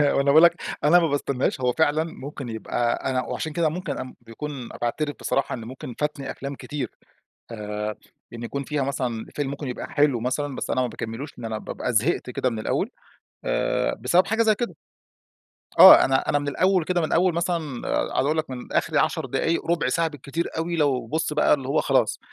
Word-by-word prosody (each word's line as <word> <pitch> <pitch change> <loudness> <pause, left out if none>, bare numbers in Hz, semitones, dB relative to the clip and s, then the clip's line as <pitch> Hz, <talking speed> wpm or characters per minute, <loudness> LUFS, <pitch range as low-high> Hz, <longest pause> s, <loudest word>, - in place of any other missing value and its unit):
وأنا 140 - +3
باقول 150 +4 +6
لَك 170 - +5 0.2
أنا 170 +4 +6
ما 165 - +2
باستناش. 140 -2 -1
هو 125 0 +2
فعلًا 155 0 +2
ممكن 140 -5 -7
يبقى 120 +2 -1
أنا 130 -1 +1
وعشان 160 -2 -4
كده 165 -1 +2
ممكن 170 -3 -4
أ 130 - -6
بيكون 125 +2 -7
باعترف 145 +5 -1
بصراحة 135 - -1
إن 115 -2 -8
ممكن 130 +1 -8
فاتني 150 -2 -2
أفلام 140 +1 -6
كتير. 140 -5 -5 0.6
آآ 105 -1 -4 0.4
إن 120 0 -7
يكون 140 +4 -4
فيها 150 -1 -1
مثلًا 125 -5 -2
فيلم 145 -2 -1
ممكن 140 -1 -5
يبقى 125 - -5
حلو 145 -5 +2
مثلًا 135 +3 -2
بس - - -4
أنا 130 - +1
ما 125 - +2
باكملوش، 120 +5 -6
لأن 120 - -8
أنا 110 -1 -3
بابقى 125 - -4
زهقت 125 +3 +1
كده 130 +1 0
من 115 - -4
الأول. - - -1 0.6
آآ - - 0
بسبب 170 +10 +3
حاجة 225 +2 +2
زي 215 -1 +4
كده. 210 -8 -3 1.0
آه - - +11
أنا 130 0 +1
أنا 145 - +3
من 145 0 -4
الأول 185 +4 +2
كده 180 0 0
من 155 - -2
أول 175 0 +3
مثلًا 165 -7 -2 0.3
عاوز 130 - +2
أقول 155 +2 +1
لَك 155 -4 -2
من 125 -1 -7
آخري - - +1
10 - - +1
دقايق 165 +1 -1
رُبع 165 -6 +1
ساعة 165 +4 +1
بالكتير 145 +3 -4
أوي 170 +1 -1
لو 140 -5 +1
بُص 155 0 -1
بقى 150 0 +4
اللي 135 -2 -5
هو 155 - +2
خلاص، - - +2
140 Hz, 200 wpm, -24 LUFS, 125-160 Hz, 1.0 s, آه